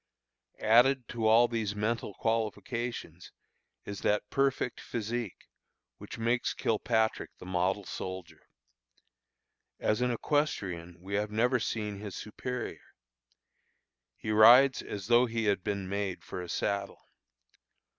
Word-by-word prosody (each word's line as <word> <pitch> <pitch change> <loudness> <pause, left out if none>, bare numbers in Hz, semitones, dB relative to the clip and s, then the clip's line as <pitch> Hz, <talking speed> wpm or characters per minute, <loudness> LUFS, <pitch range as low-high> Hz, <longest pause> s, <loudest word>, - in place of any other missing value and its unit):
Added 125 +3 +4
to 115 -2 -1
all 115 +2 +6
these 110 -3 -2
mental 105 -1 -2
qualifications, 115 -4 -3 0.5
is 100 -1 -6
that 105 0 0
perfect 135 -3 0
physique, 115 -2 -4 0.5
which - - -9
makes 115 +2 0
Kilpatrick 110 0 0
the - - -11
model 95 +2 0
soldier. 90 -3 -7 1.3
As 110 +3 +1
an 125 - +2
equestrian 100 - -1
we 95 +3 -8
have 105 +1 0
never 120 +4 +2
seen 105 -3 -3
his 105 -3 -7
superior. 125 +3 -5 1.4
He 110 - -4
rides 125 +5 +7
as 100 -2 -6
though 120 +3 +5
he 115 -1 -2
had 100 -3 +1
been 100 -2 -2
made 100 -1 -3
for 90 - -6
a 90 - -8
saddle. 100 +2 -2
110 Hz, 120 wpm, -30 LUFS, 100-120 Hz, 1.4 s, rides